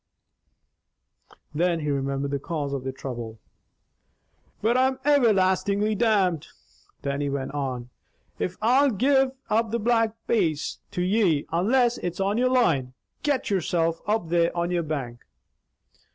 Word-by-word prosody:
Then 170 +1 +1
he 150 -1 -1
remembered 140 0 -2
the 140 - -1
cause 145 -1 -3
of 135 -2 -3
their 130 - -3
trouble. 120 -4 -7 1.2
"But, 230 +3 +1
I'm 260 +1 +2
everlastingly 205 -6 +3
damned," 200 -8 +1 0.6
Dannie 140 0 -1
went 135 -1 -3
on, 130 -4 -4 0.5
"if 185 - -3
I'll 265 +5 +4
gi'e 265 +4 +2 0.2
up 225 +1 +2
the 230 - 0
Black 225 -1 +1
Bass 165 -10 0
to 180 -3 -2
ye, 185 -6 +2
unless 235 +8 +2
it's 175 0 -4
on 200 +3 +1
your 255 +1 +3
line. 160 - +2 0.3
Get 275 -6 -1
yourself 165 -3 0
up 210 -6 0
there 170 0 +3
on 170 +1 0
your 175 -1 +1
bank!" 135 -7 -4
180 Hz, 135 wpm, -25 LUFS, 145-225 Hz, 1.2 s, I'll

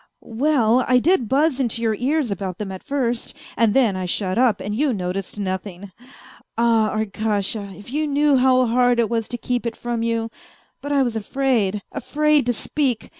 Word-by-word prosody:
" - - -53 0.2
Well, 255 -5 +3
I 250 - +4
did 255 - +2
buzz 285 0 +2
into 235 -3 -1
your 225 -1 +2
ears 260 +2 0
about 190 -2 -4
them 205 -2 -5
at 190 - -7
first, 245 -5 -2 0.2
and 225 -2 +2
then 240 -7 +3
I 185 -1 -3
shut 185 +1 -1
up, 235 -3 +3
and 205 - -4
you 280 +2 +1
noticed 190 0 -4
nothing. 190 0 -5 0.7
Ah, 230 -2 +3
Arkasha, 210 -2 -2
if 205 +4 -12
you 305 +1 0
knew 290 0 +3
how 255 0 +4
hard 245 +1 +2
it 230 -1 +1
was 225 -2 -1
to 240 - -5
keep 245 +1 -2
it 230 - -4
from 240 -1 -3
you; 230 -1 -1 0.5
but 285 - -5
I 280 -1 +3
was 240 -3 -2
afraid, 220 -4 0
afraid 295 +1 +1
to 245 - +2
speak 255 -1 -2
235 Hz, 190 wpm, -21 LUFS, 210-260 Hz, 0.7 s, I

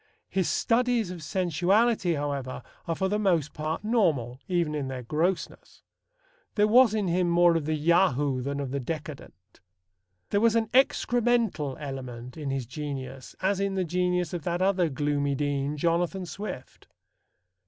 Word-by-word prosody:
His 190 -3 0
studies 235 -4 +1
of 175 -2 -7
sensuality, 185 +4 +1
however, 140 -4 -3 0.2
are 165 - 0
for 190 - 0
the 210 +2 0
most 170 -8 +1
part 155 +4 -3
normal, 160 - +1
even 175 -4 0
in 145 -3 -2
their 130 -1 -5
grossness. 165 +8 -2 0.7
There 210 0 +4
was 235 0 +6
in 210 -3 0
him 175 0 +1
more 170 0 +5
of 160 -3 0
the 155 +1 0
Yahoo 145 -5 +2
than 140 +2 -3
of 135 -2 -4
the 140 - -1
decadent. 135 - -8 0.7
There 200 - +2
was 230 0 +4
an 225 -1 +1
excremental 235 - +2
element 125 -4 -7
in 150 -3 -5
his 135 -2 -2
genius 135 0 -6
as 195 0 +1
in 195 0 -1
the 185 -1 0
genius 180 0 0
of 175 - -3
that 175 +3 -2
other 185 -3 +2
gloomy 145 0 0
dean, 145 +1 -1
Jonathan 175 +4 0
Swift. 160 -5 -8
165 Hz, 155 wpm, -27 LUFS, 140-190 Hz, 0.7 s, was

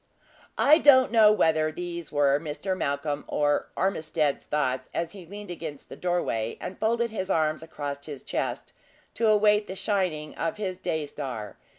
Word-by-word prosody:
I 305 +3 +6
don't 260 -6 +6
know 220 -2 +7
whether 155 -6 +2
these 170 -1 -6
were 145 -1 +3
Mr. 165 +5 -3
Malcolm 145 -2 -2
or 145 0 +1
Ormiston's 155 -6 0
thoughts, 130 -3 -1
as 165 0 -1
he 185 -4 -11
leaned 205 0 -8
against 160 -4 -7
the - - -8
door 175 -1 0
way, 110 0 -2
and 185 - -7
folded 235 +1 +1
his 190 -3 -4
arms 155 -3 +1
across 145 -3 -6
his 145 -3 -7
chest - - -3 0.4
to 230 - +1
await 210 0 +4
the 190 - -6
shining 180 -7 -1
of 165 +4 -3
his 190 -3 -3
day 160 -4 -2
star. 130 -8 -6
165 Hz, 170 wpm, -27 LUFS, 145-200 Hz, 0.4 s, know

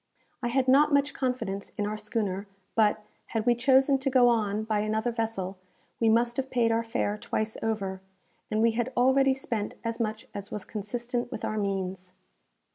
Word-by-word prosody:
I 240 - -1
had 255 +2 +1
not 290 +4 +5
much 285 0 +3
confidence 250 -7 -2
in 205 - 0
our 210 +1 -2
schooner; 210 -2 -3 0.3
but, 215 -1 +3 0.2
had 225 -1 -2
we 240 - +5
chosen 265 +3 +4
to 270 +1 0
go 255 -2 +5
on 215 -2 +1
by 215 -1 0
another 220 +3 0
vessel, 220 -5 -3 0.4
we 225 - +4
must 235 +2 +3
have 265 -1 -1
paid 235 -2 +2
our 225 0 +2
fare 225 -3 -1
twice 220 +1 -2
over, 195 -4 -2 0.5
and 215 +1 +1
we 230 - +5
had 240 +2 -1
already 265 +2 +4
spent 225 -5 -3
as 230 0 -3
much 220 +1 -2
as 200 0 -6
was 205 -2 -5
consistent 240 +4 -3
with - - -4
our 215 - -1
means. 190 -2 -3
225 Hz, 185 wpm, -28 LUFS, 210-245 Hz, 0.5 s, not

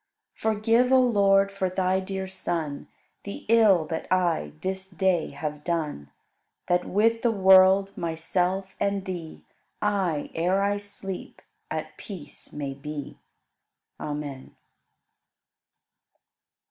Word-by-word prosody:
26. - - -23 0.2
Forgive, 230 +4 +3
O 260 - +7
Lord, 200 -5 +4
for 195 -1 -1
Thy 185 0 +1
dear 190 0 -4
Son 165 -6 -3 0.4
The 200 - -7
ill 210 -7 +5
that 160 +1 -5
I 170 - +1
this 190 0 -3
day 185 -2 +1
have 150 -1 -5
done. 150 - -2 0.6
That 175 0 +2
with 225 +3 +2
the 240 - +3
world, 190 -1 +6
myself, 180 +3 -1
and 200 -1 0
Thee 175 -4 -6 0.4
I, 190 -8 0
ere 185 +4 +1
I 205 0 +1
sleep, 200 -2 -7 0.3
at 155 0 -5
peace 170 -8 -9
may 140 -2 -4
be. 145 +1 -7 0.8
Amen. 145 -3 -6
185 Hz, 115 wpm, -26 LUFS, 160-200 Hz, 0.8 s, O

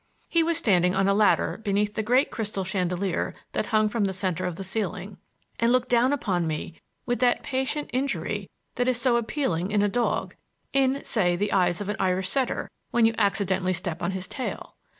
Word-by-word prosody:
He 335 - +2
was 330 0 +1
standing 185 - +3
on 195 0 +2
a 200 - +4
ladder 210 +1 +2
beneath 205 0 0
the 220 - -1
great 250 +6 +2
crystal 210 -3 -3
chandelier 185 -1 -1 0.2
that 210 - -2
hung 215 -1 +3
from 215 -1 0
the 190 - -1
center 185 -1 -1
of 180 - -4
the 195 - -6
ceiling, 195 0 -3 0.4
and 230 +1 +3
looked 255 0 +2
down 245 +2 +4
upon 185 - 0
me 155 +1 -5 0.2
with 245 -2 -1
that 245 -1 +2
patient 265 +3 -2
injury 270 +2 -2 0.3
that 245 0 +1
is 250 -2 +2
so 245 -1 +3
appealing 220 - -1
in 205 -1 +2
a - - +3
dog—in, 260 +4 -1
say, 180 -6 +1
the 205 +4 -1
eyes 175 -1 +2
of 205 - -4
an 210 - -2
Irish 185 0 +1
setter, 265 -3 -1 0.2
when 235 -1 +3
you 225 - +3
accidentally 195 -3 +1
step 175 -2 -3
on 175 - 0
his 190 -1 -3
tail. 260 - -5
205 Hz, 195 wpm, -26 LUFS, 185-245 Hz, 0.4 s, a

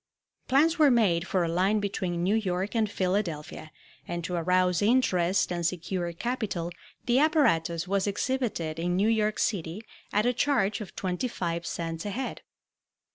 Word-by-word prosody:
Plans 315 +5 +3
were 300 -2 +7
made 190 -8 +2
for 185 -3 +1
a - - 0
line 185 +6 +2
between 185 -4 -2
New 190 +3 +2
York 195 -1 -1
and 220 -2 +2
Philadelphia, 180 -6 -2 0.4
and 175 0 -4
to 180 - -4
arouse 180 +1 +2
interest 200 -7 +2
and 175 -1 -2
secure 175 +1 -2
capital 190 -3 -3 0.3
the 245 +1 +3
apparatus 185 - +2
was 195 +1 0
exhibited 205 -8 -2
in 175 +1 0
New 200 +4 +2
York 215 -1 +1
City 185 0 -2 0.3
at 210 +2 +2
a 245 - +3
charge 235 -5 +1
of 210 - -9
twenty 185 +6 -2
five 170 -6 -3
cents 165 -1 -4
a 205 - -3
head. 255 +6 -4
190 Hz, 160 wpm, -28 LUFS, 170-220 Hz, 0.4 s, were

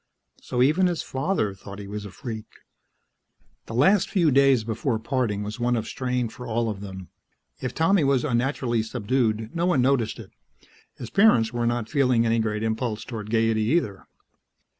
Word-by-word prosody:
So 125 0 0
even 160 +7 +3
his 175 -3 -2
father 135 - -1
thought 100 +1 -11
he 100 - -8
was 105 +1 -6
a - - -7
freak. 110 0 -7 1.2
The 115 - -6
last 190 - +4
few 170 -7 +2
days 135 -3 +4
before 115 +2 -1
parting 110 -3 -1
was 105 +3 -6
one 120 0 +1
of 115 -1 -2
strain 125 -1 -2
for 125 +2 -9
all 115 0 0
of 100 -2 -8
them. 95 -2 -8 0.5
If 130 -2 -4
Tommy 165 +1 +3
was 135 -2 +2
unnaturally 120 -2 0
subdued, 110 0 -1
no 170 +1 +1
one 145 -9 +3
noticed 125 -4 +1
it; - - -11 0.6
his 120 - -8
parents 195 - +4
were 120 -1 0
not 120 -2 -1
feeling 125 -5 +2
any 115 0 +2
great 105 -1 -1
impulse 110 0 -2
toward 110 -4 -6
gaiety 115 -1 +2
either. 110 - -1
120 Hz, 175 wpm, -25 LUFS, 110-135 Hz, 1.2 s, last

